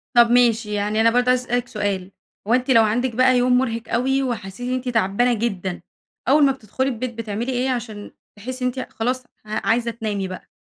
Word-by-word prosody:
طب 235 -1 +7
ماشي 230 -3 +3
يعني 210 +2 0
أنا 230 - +5
برضه 245 +2 +2
عايزة 250 0 +3
أسألِك 245 0 -1
سؤال، 200 -3 -3 0.4
هو 230 - +2
أنتِ 255 +1 +2
لو 230 -3 +6
عندك 230 +3 0
بقى 255 0 +4
يوم 250 0 +3
مرهق 230 -3 0
أوي، 265 +3 +1
وحسيتِ 230 -1 -4
إن 255 - 0
أنتِ 255 0 -2
تعبانة 230 +2 +2
جدًا 195 -6 -3 0.5
أول 290 +2 +5
ما 275 - +4
بتدخلي 260 +1 -3
البيت 250 0 -4
بتعملي 225 +2 -4
إيه 255 +1 0
عشان 230 -5 -4 0.2
تحسي 255 +5 -5
إن - - +3
أنتِ 260 - -4
خلاص 250 +3 -1 0.2
ع 215 0 -4
عايزة 235 +1 +2
تنامي 210 -4 -3
بقى؟ 185 0 -9
235 Hz, 205 wpm, -22 LUFS, 215-250 Hz, 0.5 s, طب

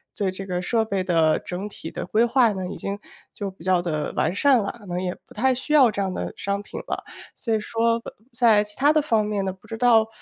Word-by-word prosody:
对 195 -2 0
这 195 +1 -7
个 180 -1 -2
设 225 +4 +1
备 195 -3 -1
的 165 -3 +3
整 185 +3 -5
体 165 -5 -8
的 - - -5
规 215 +6 +2
划 240 -2 +4
呢， 185 -1 -4
已 - - -6
经 200 0 -4 0.4
就 200 -2 -4
比 185 - -16
较 185 -2 +3
地 155 -4 -2
完 - - +1
善 260 +4 +4
了， 200 - -2
可 205 - -14
能 180 -1 -3
也 180 -1 -2
不 - - -17
太 260 +4 +2
需 265 +4 -3
要 265 -6 +7
这 200 -1 -2
样 190 -1 -1
的 - - -4
商 200 0 -2
品 - - -7
了。 - - -3 0.3
所 230 -3 -2
以 215 - +2
说 230 +2 +1 0.3
在 230 -4 +4
其 210 0 -12
他 290 +3 +4
的 310 - +4
方 225 -7 +1
面 210 -2 -1
呢， 190 - -1
不 190 - -16
知 225 - -5
道， 225 -2 +5
210 Hz, 275 characters per minute, -24 LUFS, 185-230 Hz, 0.4 s, 要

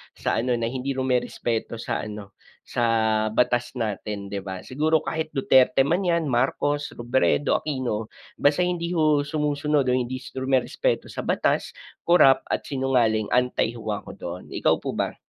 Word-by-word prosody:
sa - - -1
ano 125 +1 +1
na 115 0 -2
hindi 135 +1 -3
rumerespeto 125 -3 -1
sa 115 - -3
ano, 105 -1 -8 0.3
sa 120 - -2 0.4
batas 120 +3 0
natin, 105 -3 -4
'di 100 - -2
ba? 95 -1 -7
Siguro, 155 +3 +1
kahit 155 -1 -3
Duterte 130 0 +4
man 165 +7 +1
'yan, 170 -5 +1
Marcos, 145 +4 0
Robredo, 120 +4 +1
Aquino, 125 -7 -3 0.3
basta 145 +5 +3
hindi 175 -1 -1
ho 155 -2 +3
sumusunod 150 0 0
o 130 - 0
hindi 125 0 0 0.2
rumerespeto 130 -1 0
sa - - -7
batas, - - 0 0.3
corrupt, 135 -6 +5
at - - -1
sinungaling, 125 -6 +1
anti 125 -2 +1
ho, 110 -2 -4
ako 105 -1 -6
doon. 90 -1 -7
Ikaw - - +1
po - - -4
ba? - - -2
130 Hz, 155 wpm, -24 LUFS, 115-145 Hz, 0.4 s, corrupt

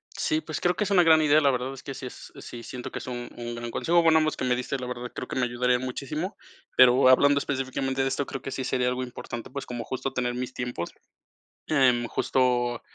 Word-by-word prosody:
Sí, 315 0 0
pues, - - -5
creo 180 0 +2
que - - 0
es 200 - -3
una 190 -3 +6
gran 160 -2 +6
idea, 150 +1 +5
la 140 - +4
verdad 130 +1 -1
es 135 - -10
que 135 - -7
sí 130 - -7
es 125 - -10
sí 120 - -9
siento 125 +1 -7
que - - -4
es - - -9
un 120 -1 -5
un 120 0 -5
gran 120 0 -5
consejo. 170 +5 +2
Bueno, 160 -1 +6
ambos 155 0 0
que - - -2
me 125 -1 +2
diste 125 +3 -3
la 130 - -5
verdad, 125 0 -5
creo - - -6
que - - -5
me 130 -1 +2
ayudaría 125 +1 +1
muchísimo, 145 - -4 0.4
pero 130 +1 +7
hablando 140 +2 +5
específicamente 135 -1 -2
de - - +1
esto, 140 +1 -2
creo 135 - -5
que 135 - -5
sí 130 0 -3
sería 125 -1 +1
algo 125 0 -2
importante, 120 -1 -7
pues, 140 0 -6
como 120 -1 -5
justo 130 +3 -4
tener 125 -1 -1
mis 125 0 -4
tiempos, 120 -10 -4 0.8
em, 130 -5 +3
justo 120 -1 +1
130 Hz, 245 wpm, -26 LUFS, 125-140 Hz, 0.8 s, pero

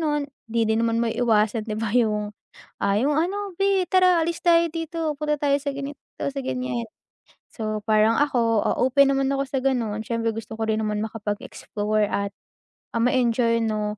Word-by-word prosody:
nun, 295 -3 -1 0.2
'di 230 0 +1
din 220 - +1
naman 230 0 +1
maiiwasan 225 -1 +1
'di 215 - -2
ba 220 -1 -2
yung, 210 -3 +1 0.5
ah, 200 +1 +2
yung 285 +5 +1
ano, 385 +4 -1
"Be 390 -1 +2
tara 365 -2 +4
alis 335 +1 -2
tayo 335 -1 +5
dito, 325 -1 -3
punta 300 0 -1
tayo 280 -1 +2
sa 280 0 -2
ganito 280 +1 -6 0.2
sa 280 0 -2
ganyan." 255 -2 -2 0.7
So 215 -2 -2
parang 215 +1 +4
ako, 235 -6 +2
ah, - - +1
open 275 +2 +4
naman 270 0 +1
ako 275 0 -1
sa 265 -1 -2
ganon. 230 -5 0
Siyempre, 230 -1 -2
gusto 225 0 -7
ko 220 - -1
rin 220 0 0
naman 210 -1 -1
makapag-explore 215 -1 -2
at 200 0 -1 0.6
ah, 230 - +1
ma-enjoy 235 -2 +2
'no, 210 -1 -2
240 Hz, 175 wpm, -24 LUFS, 220-290 Hz, 0.7 s, tayo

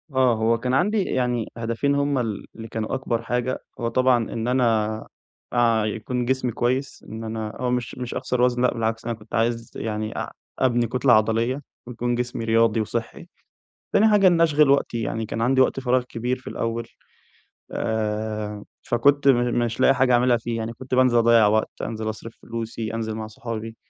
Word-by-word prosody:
آه، 130 -3 +4
هو 115 +1 +2
كان 125 +2 -2
عندي 200 +8 +2
يعني 125 -5 -1
هدفين 115 +5 0
هُم 140 -1 +1
ال 110 -5 -3
اللي 115 0 -8
كانوا 110 +1 -4
أكبر 120 -3 -2
حاجة، 125 +2 -1 0.2
هو 115 - -1
طبعًا 130 +1 +3 0.2
إن 115 0 -3
أنا 110 -4 +1 0.5
أع 115 -3 +3
يكون 120 +3 -2
جسمي 130 -1 0
كويس، 130 +5 -2
إن 110 +1 -6
أنا 110 -1 -4
هو 125 -1 0
مش 125 -1 -2
مش 125 -1 -5
أخسر 125 -1 -1
وزن، 125 0 +2
لأ 125 - +3
بالعكس 115 0 -2
أنا 120 - -1
كنت 105 0 -9
عايز 115 0 0
يعني 110 -1 -3
أع - - -4 0.3
أبني 120 -2 +2
كُتلة 125 +1 +3
عضلية 115 +5 +2 0.3
ويكون 120 0 -2
جسمي 120 -2 -3
رياضي 115 0 +3
وصحّي، 115 +1 -4 0.7
تاني 220 +2 +5
حاجة 205 -2 +5
إن 175 -2 +4
اشغل 150 -3 +4
وقتي 135 -4 +2
يعني، 110 0 -2
كان 115 - -4
عندي 130 +3 +3
وقت 130 - +2
فراغ 125 -1 +1
كبير 125 +1 -3
في - - -17
الأول 115 0 -3 0.8
آآ، 105 -1 -2 0.2
فكنت 140 +4 +2
م 120 -2 +3
مش 115 0 -4
لاقي 135 - +5
حاجة 125 0 +3
اعاملها 120 0 +4
فيه 115 0 -4
يعني، 115 +1 -4
كنت 130 +1 -4
بانزل 130 -2 +4
أضيّع 115 -2 +5
وقت، 110 +1 0
أنزل 110 -1 -3
أصرف 110 +1 -7
فلوسي، 115 -1 -5
أنزل 110 -1 -3
مع 110 -1 -5
صحابي، 115 0 -6
115 Hz, 185 wpm, -23 LUFS, 110-125 Hz, 0.8 s, تاني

